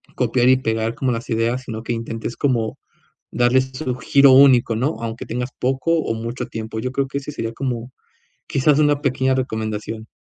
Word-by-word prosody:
copiar 125 0 +2
y 130 - +7
pegar 115 -2 -1
como 130 -2 -1
las 115 0 -4
ideas, 115 +2 0
sino 110 -2 -6
que - - -4
intentes 115 0 -5
como 120 -6 0 0.5
darles 130 +2 +2
su 130 -3 -3
giro 140 0 +5
único, 130 -4 +6
¿no?, 130 +8 -1
aunque 115 0 -5
tengas 125 +2 -3
poco 135 +5 0
o 130 - -1
mucho 115 +3 -5
tiempo. 110 0 -5
Yo 130 - -3
creo 135 0 0
que 140 +1 -4
ese 140 +1 -7
sería 115 -6 -4
como, 125 -1 -4 0.5
quizás, 140 +2 +2
una 145 -1 +3
pequeña 130 -1 +1
recomendación. 110 -3 -3
125 Hz, 180 wpm, -21 LUFS, 115-130 Hz, 0.5 s, y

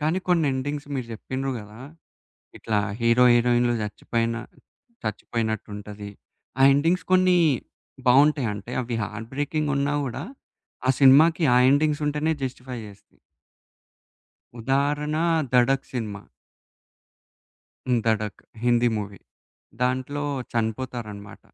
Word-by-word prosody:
కానీ 155 +5 +1
కొన్ని 170 -4 +3
ఎండింగ్స్ 145 +2 -3
మీరు 130 -3 -3
చెప్పిండ్రు 130 +4 -4
గదా! 105 +3 -12 0.8
ఇట్లా 110 -2 -1 0.2
హీరో 115 +2 +4
హీరోయిన్లు 120 0 +3
చచ్చిపోయిన 115 +2 -2 0.7
చచ్చిపోయినట్టు 110 0 -3
ఉంటది. 105 0 -8 0.5
ఆ - - +6
ఎండింగ్స్ 165 +6 +1
కొన్ని 185 -1 +5 0.7
బావుంటాయంటే 125 -5 +3
అవి 120 -1 -3
హార్ట్ 110 +2 -7
బ్రేకింగ్ 145 +1 -1
ఉన్నా 140 +1 0
గూడా. 120 -3 -5 0.6
ఆ - - +5
సినిమాకి 155 +5 +6
ఆ - - +5
ఎండింగ్స్ 150 +1 +2
ఉంటేనే 150 +2 0
జస్టిఫై 125 -1 -5
జేస్తాయి. 100 -1 -17 1.4
ఉదాహరణ, 145 +4 0 0.3
'ధడక్' 130 +2 +2
సినిమా. 105 -5 -5 1.6
హ్మ్. 125 -2 +3
'ధడక్' 110 -2 -1 0.2
హిందీ 120 0 +3
మూవీ. 100 -2 -7 0.6
దాంట్లో 130 +3 -1 0.3
చనిపోతారనమాట. 110 -3 -4
125 Hz, 105 wpm, -24 LUFS, 110-145 Hz, 1.6 s, ఆ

